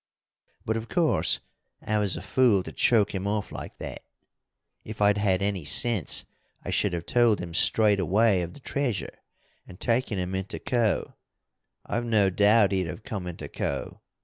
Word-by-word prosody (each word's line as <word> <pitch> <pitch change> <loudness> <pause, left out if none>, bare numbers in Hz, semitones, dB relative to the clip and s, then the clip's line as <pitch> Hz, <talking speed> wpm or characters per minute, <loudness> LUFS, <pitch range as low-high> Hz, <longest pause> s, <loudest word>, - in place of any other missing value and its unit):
"But, 110 +1 0
of 115 +1 -6
course, 170 -4 +1 0.4
I 105 0 -1
was 100 -5 0
a 85 - -7
fool 105 -2 +3
to - - -7
choke 110 -5 +2
him 95 0 -3
off 105 0 -2
like - - -8
that. - - -7 0.8
If 110 0 -9
I'd 105 0 +3
had 100 -2 +1
any 100 -4 -1
sense 115 - 0 0.4
I - - -3
should 100 -3 +1
have 85 -1 -3
told 120 -3 +3
him 85 -1 -6
straight 105 +3 +3
away 100 +1 +3
of 85 0 -6
the 145 - -13
treasure 130 -8 -3 0.5
and 90 - -13
taken 115 -3 0
him 90 0 -3
into 95 +1 -3
Co. 120 -4 0 0.7
I've 120 0 -2
no 105 -4 +3
doubt 105 +2 +4
he'd 95 -3 0
have 105 - -7
come 105 -9 -5
into 90 - -6
Co. - - -4
105 Hz, 175 wpm, -26 LUFS, 95-115 Hz, 0.8 s, doubt